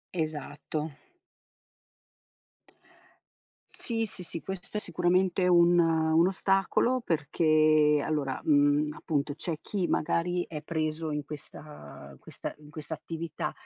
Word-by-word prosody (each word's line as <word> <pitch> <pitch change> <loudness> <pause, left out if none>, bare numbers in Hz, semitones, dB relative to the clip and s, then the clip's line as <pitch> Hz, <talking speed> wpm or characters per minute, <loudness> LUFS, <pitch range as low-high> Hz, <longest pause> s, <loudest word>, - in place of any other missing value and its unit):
Esatto. 155 -1 -4 2.8
Sì, 225 -1 -2
sì, 190 -3 -7
sì, 170 -1 -5
questo 190 +2 -6
è - - +1
sicuramente 180 -1 +1
un 175 0 +5
un 165 0 +3
ostacolo 195 +6 +1
perché 155 - +3
allora, 145 -4 -1
mhmm, 145 0 +4
appunto, 145 -2 -2
c'è 165 +2 -3
chi 190 -4 -2
magari 175 +2 0
è 150 -2 -6
preso 155 0 -2
in 150 -1 -3
questa 150 - -11
in 65 - -16
questa - - -7
in 150 - -15
questa 150 +1 -7
attività 165 0 -5
160 Hz, 115 wpm, -29 LUFS, 150-175 Hz, 2.8 s, un